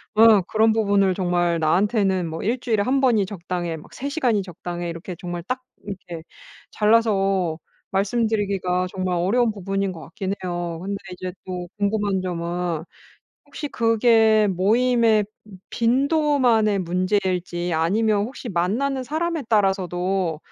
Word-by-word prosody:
네 220 - +6 0.2
그런 220 0 +3
부분을 200 -4 +2
정말 175 -2 +1
나한테는 190 +2 +2
뭐 160 - -5
'일주일에 225 -2 0
1 270 +3 +1
번이 225 -7 +3
적당해.' 175 -3 -4
막 150 - -14
'3 280 - -4
시간이 245 -9 +1
적당해.' 175 -1 -6
이렇게 170 +2 -7
정말 175 -1 -5
딱 255 0 -3 0.2
이렇게 180 -4 -7 0.5
잘라서 195 -6 +2 0.3
말씀드리기가 200 -3 0
정말 185 -1 -1
어려운 220 +7 +2
부분인 195 -1 -2
것 160 - -10
같긴 185 +6 -4
해요. 175 -2 -3
근데 200 +2 -3 0.2
이제 180 0 -6
또 180 -1 -5
궁금한 200 -2 0
점은 170 -2 -3 0.6
혹시 290 +1 -6
그게 225 -2 +4
모임의 220 +3 +3 0.5
빈도만의 250 - +2
문제일지 180 -1 -1
아니면 205 +5 +2
혹시 255 -1 -8
만나는 240 +10 0
사람에 320 +2 -2
따라서도 190 -4 0
195 Hz, 295 characters per minute, -23 LUFS, 180-225 Hz, 0.6 s, 네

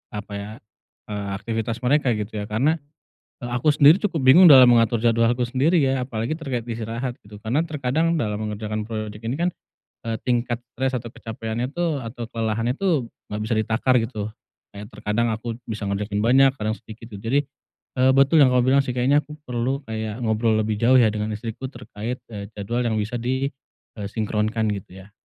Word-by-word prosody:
apa 105 0 -6
ya, 100 +1 -7 0.6
eee, 105 -1 -3
aktivitas 115 +3 -3
mereka 130 -2 +2
gitu 105 0 -4
ya, 105 - -5
karena, 140 +10 +1 0.6
eee, 120 - -4
aku 135 +5 +2
sendiri 150 +6 +7
cukup 180 -9 -1
bingung 170 +8 +8
dalam 130 -5 +9
mengatur 115 -1 +3
jadwalku 115 +1 +3
sendiri 140 +7 +2
ya, 135 0 +1
apalagi 115 0 -3
terkait 130 -7 -3
istirahat 115 +2 -4
gitu. 105 0 -13
Karena 120 +6 +1
terkadang 155 +3 0
dalam 105 -9 -1
mengerjakan 105 0 -4
project 110 -1 -5
ini 115 +3 -2
kan, 175 +1 +2 0.6
eee, 115 0 -1
tingkat 120 -1 -1
stres 130 +1 -1
atau 120 -1 -6
kecapaiannya 115 +1 -4
tuh 170 -4 0
atau 115 -1 -7
kelelahannya 115 +3 -1
tuh 160 -12 0 0.2
enggak 105 +1 -4
bisa 110 +2 -1
ditakar 110 +4 +1
gitu. 110 -2 -3 0.4
Kayak 100 +1 -9
terkadang 105 +3 0
aku 115 +1 -5
bisa 110 -2 -5
ngerjain 100 +1 -2
banyak, 135 +4 +5
kadang 110 -3 -2
sedikit 115 +1 -12
gitu. 100 - -8
Jadi, 115 +7 0 0.6
eee, 130 +1 +5
betul 140 +4 +5
yang 130 -4 +6
kamu 125 - +4
bilang 140 +1 +5
sih 125 - -2
kayaknya 130 +4 +3
aku 150 - -10
perlu 125 +1 -2
kayak 110 +1 -4
ngobrol 110 0 +1
lebih 105 -1 -2
jauh 120 +4 +4
ya 110 -3 +4
dengan 105 0 -3
istriku 115 +4 -6
terkait, 125 -2 -7
eee, 100 -2 -6
jadwal 110 +4 -2
yang 115 - 0
bisa 110 +4 -3
di, 130 +3 -1 0.5
eee, 100 - -4
sinkronkan 110 +1 -1
gitu 95 -2 -7
ya. 100 - -17
115 Hz, 185 wpm, -23 LUFS, 110-130 Hz, 0.6 s, dalam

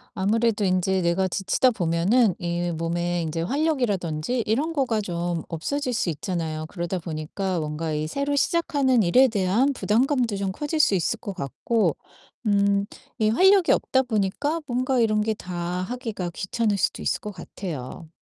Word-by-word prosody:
아무래도 215 +2 +1
인제 185 0 +1
내가 170 +2 +2
지치다 195 +7 +2
보면은 190 +4 +2
이 175 0 -2
몸에 170 +1 -1
인제 165 0 -2
활력이라든지 235 - 0
이런 285 +10 0
거가 260 -7 +1
좀 175 -4 -2
없어질 255 - -2
수 205 - 0
있잖아요. 160 -1 -3
그러다 175 0 -3
보니까 170 +3 -3
뭔가 155 +1 -3
이 150 0 -1
새로 280 - -1
시작하는 280 - +2
일에 250 +10 +5
대한 220 +5 +1
부담감도 245 -1 +1
좀 195 -1 -1
커질 295 - -3
수 300 -10 +4
있을 190 +5 0
것 200 - -6
같고 175 - 0 0.5
음 200 -1 +3 0.3
이 215 -1 +3
활력이 375 - +5
없다 260 - +2
보니까 245 - -1
뭔가 255 0 0
이런 215 -2 +2
게 220 +1 0
다 180 -3 -8 0.3
하기가 225 -5 -4
귀찮을 205 +3 -1
수도 - - 0
있을 - - 0
것 210 - -5
같아요. 165 -5 -7
200 Hz, 330 characters per minute, -24 LUFS, 175-250 Hz, 0.5 s, 일에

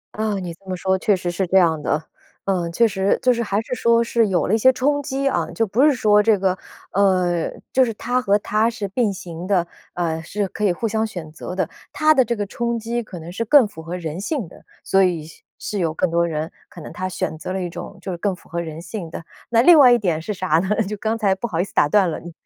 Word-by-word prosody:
啊， 215 -1 -1
你 180 -3 -4
这 185 +4 -22
么 185 -1 -4
说 190 +1 +1
确 210 +2 +2
实 180 -1 -3
是 175 +2 -1
这 185 +2 +2
样 165 -4 +3
的。 150 +1 0 0.4
呃， 180 -3 0
确 230 +6 +3
实， 190 -1 0
就 250 -1 +5
是 235 - -2
还 205 -2 0
是 250 - -6
说 235 -1 +3
是 230 -1 +2
有 185 -3 +1
了 195 - 0
一 - - +5
些 260 +4 +6
冲 285 +3 0
击 275 -1 -2
啊， 275 - 0
就 225 - 0
不 225 +7 +1
是 300 - +6
说 210 -4 +4
这 215 -1 +3
个， 185 -1 0 0.3
呃， 180 -4 +2 0.2
就 260 - +5
是 235 - 0
它 250 +4 -1
和 205 -2 +3
它 215 +2 +1
是 215 -3 -4
并 210 +1 0
行 175 -1 -7
的， 185 -4 +2 0.3
呃， 165 -2 -2
是 200 +4 -3
可 210 - -6
以 200 - +4
互 225 +6 -2
相 220 +1 0
选 175 -7 -7
择 160 +3 -7
的。 190 - 0 0.2
它 310 0 +4
的 265 -4 +4
这 235 0 -2
个 205 - -2
冲 235 +3 -2
击 230 +1 -2
可 210 -5 -9
能 165 +2 -9
是 205 +6 -2
更 245 +1 +5
符 160 -6 -11
合 170 +3 -5
人 165 +1 -5
性 245 - -2
的， - - -16 0.2
所 195 0 +3
以 170 -4 0
是 160 - -15 0.2
是 205 - -4
有 165 -3 +1
更 170 +2 0
多 170 0 +2
人， 160 0 -3 0.2
可 - - -12
能 - - -9
它 185 0 -3
选 160 -3 -3
择 155 +4 -6
了 190 - -2
一 - - -2
种 175 +3 -8
就 190 - -6
是 175 - -4
更 200 +1 0
符 - - -20
合 170 +1 -3
人 160 -1 -7
性 175 -1 -6
的。 165 - -8 0.2
那 230 0 +4
另 340 +3 +8
外 255 -3 +8
一 240 - +6
点 170 -7 -1
是 210 - -4
啥 185 -5 +1
呢？ 190 - -2
就 210 +2 -4
刚 220 +2 -1
才 200 -4 +2
不 215 +5 -4
好 165 -5 -3
意 - - +3
思 195 - -10
打 145 - +3
断 195 -2 +4
了， - - -4
嗯。 175 - -10
195 Hz, 295 characters per minute, -21 LUFS, 175-225 Hz, 0.4 s, 另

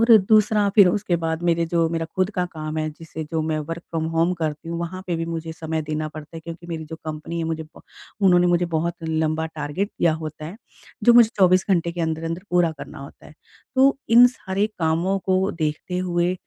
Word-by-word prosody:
और 230 0 +7
दूसरा 215 -1 +4
फ़िर 200 -4 +8
उसके 190 -1 0
बाद 160 +1 -2
मेरे 170 -1 +2
जो 165 0 +1
मेरा 165 0 -2
खुद 185 +2 +1
का 180 -3 +1
काम 155 -1 -5
है 155 0 -1
जिसे 160 0 -8
जो 160 +1 -2
मैं 155 0 -1
वर्क 165 +3 -5
फ्रॉम 160 -1 -2
होम 165 +2 +2
करती 160 -1 -4
हूँ 170 - -3
वहाँ 175 +2 -5
पे 175 - -1
भी 165 - -2
मुझे 165 -1 -4
समय 160 0 -3
देना 155 0 -3
पड़ता 155 +1 -10
है - - -7
क्योंकि 165 +1 -9
मेरी 165 -2 -5
जो 160 +1 -8
कंपनी 155 +2 -5
है 165 - -1
मुझे 160 0 -3
बो 155 - -16 0.4
उन्होंने 180 -1 +5
मुझे 175 0 +2
बहुत 170 +2 0
लंबा 160 0 0
टारगेट 160 +5 -3
दिया 165 -2 +3
होता 155 0 -6
है 170 +7 -7 0.5
जो 240 - +7
मुझे 235 -2 +8
24 185 0 +5
घंटे 170 -2 +2
के 175 - -5
अंदर-अंदर 165 +2 -2
पूरा 175 -2 +3
करना 155 - -9
होता 140 +1 -12
है। - - -14 0.4
तो 270 +1 +5
इन 240 +2 +8
सारे 205 -5 -1
कामों 170 +4 +1
को 190 +1 +1
देखते 160 +3 -3
हुए 175 -1 0
165 Hz, 220 wpm, -23 LUFS, 160-180 Hz, 0.5 s, फ़िर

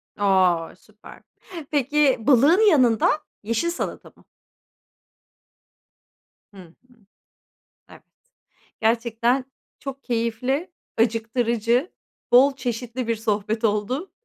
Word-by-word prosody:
A! 185 -5 +1
Süper. 215 +3 -17 0.5
Peki 285 -1 +2
balığın 295 - +4
yanında, 255 - +3 0.2
yeşil 230 +10 -1
salata 345 - -5
mı? - - -24 2.3
Hı - - -16
hı. 170 -1 -17 1.2
Evet. - - -16 0.8
Gerçekten 235 +3 +1 0.3
çok 275 0 -8
keyifli, 250 +7 -2 0.3
acıktırıcı, 235 - 0 0.4
bol 270 +3 +6
çeşitli 245 -1 -4
bir 230 - 0
sohbet 215 0 -2
oldu. 225 - -1
235 Hz, 85 wpm, -23 LUFS, 220-270 Hz, 2.3 s, bol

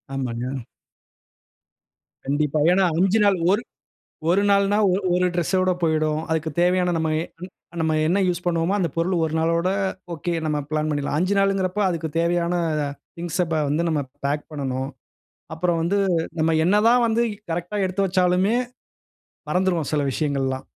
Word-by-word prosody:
ஆமாங்க. 125 -1 -3 1.7
கண்டிப்பாங்க. 150 +2 +1
ஏன்னா 190 0 +3
5 195 +4 +3
நாள், 200 -2 +4
ஒரு 205 +4 +2 0.7
1 190 +3 +3
நாள்னா 200 +1 +3 0.2
ஒரு 190 - 0
1 180 0 +2
டிரெஸ் 175 +1 -1
ஓட 185 0 +2
போய்டும். 155 -1 +1
அதுற்குத் 160 -1 -2
தேவயான 180 0 +2
நம்ம 160 -1 0 0.7
நம்ம 160 -1 +1
என்ன 180 +5 +2
யூஸ் 180 0 -1
பண்ணுவோமோ, 170 +1 +1
அந்த 180 -4 0
பொருள் 170 +3 0
1 155 - -4
நாளோட, 165 +2 +1 0.4
ஓகே 170 +2 -3
நம்ம 150 -1 0
பிளான் 155 0 -1
பண்ணிடலாம். 145 -1 -1
5 185 +3 +1
நாளுங்குறப்போ 195 0 +1
அதுக்குத் 165 -3 -3
தேவையான 170 +1 +1 0.6
திங்ஸா 175 +1 -1 0.2
வந்து 155 +4 +1
நம்ம 155 -3 0 0.2
பேக் 145 +1 0
பண்ணணும். 135 -2 -3 0.7
அப்புறம் 170 0 0
வந்து 185 +5 +1 0.4
நம்ம 160 +1 +2
என்னதான் 225 +6 +4
வந்து 230 +1 +2 0.3
கரெக்ட்டா 175 +5 -3
எடுத்து 190 +1 0
வெச்சாலுமே, 185 +3 +2 1.0
மறந்துடுவோம் 180 -3 0
சில 150 -1 +1
விஷயங்களெல்லாம். 135 -2 -1
170 Hz, 140 wpm, -23 LUFS, 155-185 Hz, 1.7 s, நாள்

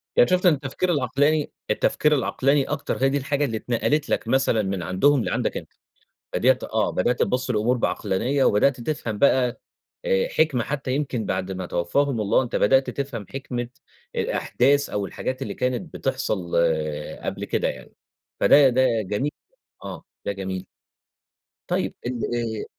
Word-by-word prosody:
يعني - - +5
شُفت 180 +1 +2
إن 175 - +7
التفكير 145 +6 -2
العقلاني 145 +1 +1 0.2
التفكير 150 0 +2
العقلاني 140 +1 +2
أكتر 140 -2 -3
هي 135 - +5
دي 140 - +1
الحاجة 140 +1 0
اللي 115 -5 -2
اتنقلت 140 +6 0
لك - - -1
مثلًا 130 -4 +2
من 95 -2 -2
عندهم 120 +10 +3
لعندك - - -1
أنت. - - -9 0.6
بدأت 130 +1 +3
آه، 110 -1 0
بدأت 120 +7 0
تبص 125 0 0
للأمور 120 +2 +1
بعقلانية، 125 +5 0
وبدأت 125 +4 +3
تفهم 115 -6 -3
بقى 130 -2 +3 0.5
آآ، 485 0 +2
حكمة 155 - +1
حتى 135 -1 -3
يمكن 135 -6 -2
بعد 95 0 -2
ما 95 -1 -4
توفاهم 115 +9 0
الله، 105 +5 +3
أنت 120 - -5
بدأت 135 +6 +3
تفهم 135 -7 -4
حكمة 125 -3 -4 0.5
الأحداث 140 +1 +1
أو 100 -1 -2
الحاجات 130 +6 -4
اللي 135 - -3
كانت 130 +7 -2
بتحصل 110 -10 -2 0.7
قبل - - -3
كده - - 0
يعني. - - -7 0.5
فده 140 -2 +7
ده 130 +1 +2 0.2
جميل 105 +9 -2 0.5
آه، - - -7 0.2
ده - - 0
جميل. 95 -1 -5 1.0
طيب - - -1
ال 125 -1 -3
آآ 115 -2 -3
130 Hz, 155 wpm, -24 LUFS, 110-140 Hz, 1.0 s, إن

